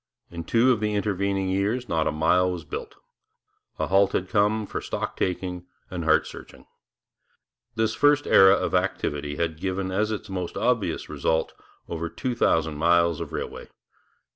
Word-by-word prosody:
In 85 Hz, -1 st, -6 dB
two 120 Hz, +7 st, +3 dB
of 120 Hz, -, +1 dB
the 105 Hz, -1 st, -1 dB
intervening 100 Hz, -1 st, -1 dB
years 105 Hz, +6 st, -1 dB
not 80 Hz, -4 st, 0 dB
a -, -, +1 dB
mile 90 Hz, +4 st, +2 dB
was 85 Hz, -3 st, -5 dB
built. -, -, -7 dB, 0.8 s
A -, -, 0 dB
halt 100 Hz, +1 st, +3 dB
had 95 Hz, 0 st, -1 dB
come, 105 Hz, +1 st, +2 dB
for -, -, -5 dB
stock -, -, -4 dB
taking 90 Hz, -1 st, -3 dB, 0.2 s
and 85 Hz, -3 st, -4 dB
heart 80 Hz, -1 st, +4 dB
searching. -, -, -12 dB, 1.1 s
This 110 Hz, -1 st, +1 dB
first 145 Hz, 0 st, +3 dB
era 95 Hz, 0 st, +7 dB
of -, -, -2 dB
activity 75 Hz, 0 st, -1 dB
had 80 Hz, 0 st, -2 dB
given 95 Hz, 0 st, -2 dB
as 105 Hz, +3 st, 0 dB
its 110 Hz, -, -4 dB
most 90 Hz, -2 st, -5 dB
obvious 115 Hz, -9 st, 0 dB
result 80 Hz, 0 st, -1 dB, 0.3 s
over 85 Hz, 0 st, -4 dB
two 125 Hz, +10 st, -3 dB
thousand 80 Hz, -9 st, +1 dB
miles 85 Hz, 0 st, +3 dB
of -, -, -6 dB
railway. -, -, -6 dB
95 Hz, 165 wpm, -25 LUFS, 85-105 Hz, 1.1 s, era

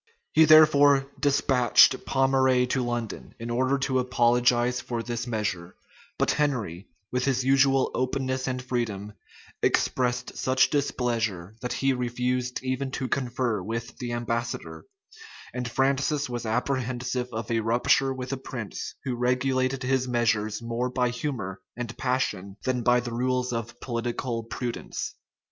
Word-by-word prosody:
He 160 Hz, -, +7 dB
therefore 145 Hz, -3 st, +7 dB
despatched 135 Hz, -2 st, +4 dB
Pommeraye 130 Hz, -1 st, +3 dB
to 130 Hz, 0 st, 0 dB
London, 120 Hz, -2 st, -4 dB
in 115 Hz, +1 st, -5 dB
order 130 Hz, +3 st, +2 dB
to 135 Hz, -1 st, 0 dB
apologize 120 Hz, 0 st, +2 dB
for 120 Hz, -1 st, -4 dB
this 120 Hz, +1 st, -4 dB
measure; 100 Hz, -6 st, -3 dB, 0.4 s
but -, -, +2 dB
Henry, 115 Hz, -, -1 dB, 0.2 s
with 125 Hz, 0 st, 0 dB
his 130 Hz, -2 st, +1 dB
usual 135 Hz, 0 st, +4 dB
openness 130 Hz, 0 st, -1 dB
and 130 Hz, -1 st, -2 dB
freedom, 110 Hz, -5 st, -3 dB, 0.5 s
expressed 125 Hz, -1 st, +1 dB
such 130 Hz, 0 st, +3 dB
displeasure, 115 Hz, -9 st, -1 dB
that 125 Hz, -, -3 dB
he 135 Hz, 0 st, +1 dB
refused 125 Hz, 0 st, -2 dB
even 130 Hz, +1 st, -2 dB
to 130 Hz, 0 st, -3 dB
confer 120 Hz, -5 st, -1 dB
with 115 Hz, +4 st, -5 dB
the 120 Hz, -1 st, -4 dB
ambassador; 120 Hz, 0 st, -3 dB, 0.7 s
and 125 Hz, -1 st, -3 dB
Francis 140 Hz, +3 st, +1 dB
was 120 Hz, -2 st, -4 dB
apprehensive 125 Hz, +1 st, -1 dB
of 110 Hz, +1 st, -4 dB
a 115 Hz, -, +2 dB
rupture 120 Hz, +4 st, +2 dB
with 130 Hz, 0 st, -4 dB
a -, -, -2 dB
prince 120 Hz, -4 st, -6 dB
who 130 Hz, -3 st, -2 dB
regulated 130 Hz, +2 st, 0 dB
his 130 Hz, 0 st, +1 dB
measures 115 Hz, -3 st, 0 dB
more 120 Hz, +2 st, -2 dB
by 125 Hz, -1 st, +1 dB
humor 120 Hz, -7 st, -4 dB, 0.2 s
and 120 Hz, -1 st, -5 dB
passion 105 Hz, -7 st, -2 dB
than 130 Hz, -2 st, 0 dB
by 125 Hz, +1 st, +4 dB
the 120 Hz, 0 st, -5 dB
rules 125 Hz, +1 st, 0 dB
of 120 Hz, +1 st, -5 dB
political 120 Hz, 0 st, -3 dB
prudence. 120 Hz, 0 st, -4 dB
125 Hz, 140 wpm, -26 LUFS, 120-130 Hz, 0.7 s, He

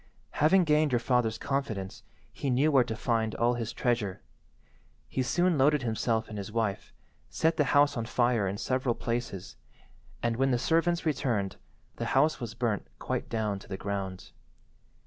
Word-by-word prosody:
Having 180 Hz, +5 st, +5 dB
gained 150 Hz, -2 st, +3 dB
your 120 Hz, -, +3 dB
father's 120 Hz, -2 st, +1 dB
confidence 110 Hz, -9 st, -3 dB, 0.3 s
he 140 Hz, -, -3 dB
knew 135 Hz, +5 st, +3 dB
where 135 Hz, -3 st, +5 dB
to 115 Hz, -2 st, -4 dB
find 110 Hz, -1 st, 0 dB
all 120 Hz, +1 st, +2 dB
his 115 Hz, -2 st, -3 dB
treasure. 115 Hz, -7 st, -1 dB, 0.8 s
He 130 Hz, -, -2 dB
soon 175 Hz, +5 st, +2 dB
loaded 145 Hz, 0 st, +4 dB
himself 115 Hz, 0 st, 0 dB
and 105 Hz, -2 st, -6 dB
his 100 Hz, +1 st, -6 dB
wife, 110 Hz, -3 st, -2 dB, 0.4 s
set 160 Hz, +1 st, +1 dB
the 150 Hz, -, +2 dB
house 145 Hz, +1 st, +4 dB
on 115 Hz, -2 st, -2 dB
fire 120 Hz, -4 st, +2 dB
in 95 Hz, +2 st, -3 dB
several 130 Hz, +1 st, 0 dB
places, 115 Hz, -6 st, -4 dB, 0.7 s
and, 115 Hz, -1 st, 0 dB
when 135 Hz, +1 st, +2 dB
the 125 Hz, -, +2 dB
servants 165 Hz, +6 st, +1 dB
returned, 115 Hz, -10 st, -1 dB, 0.4 s
the -, -, -3 dB
house 155 Hz, +3 st, +3 dB
was 115 Hz, -2 st, -6 dB
burnt 115 Hz, -4 st, -1 dB
quite -, -, -3 dB
down 105 Hz, -3 st, -1 dB
to -, -, -15 dB
the 95 Hz, -, -5 dB
ground. 95 Hz, -2 st, -4 dB
120 Hz, 165 wpm, -29 LUFS, 110-140 Hz, 0.8 s, Having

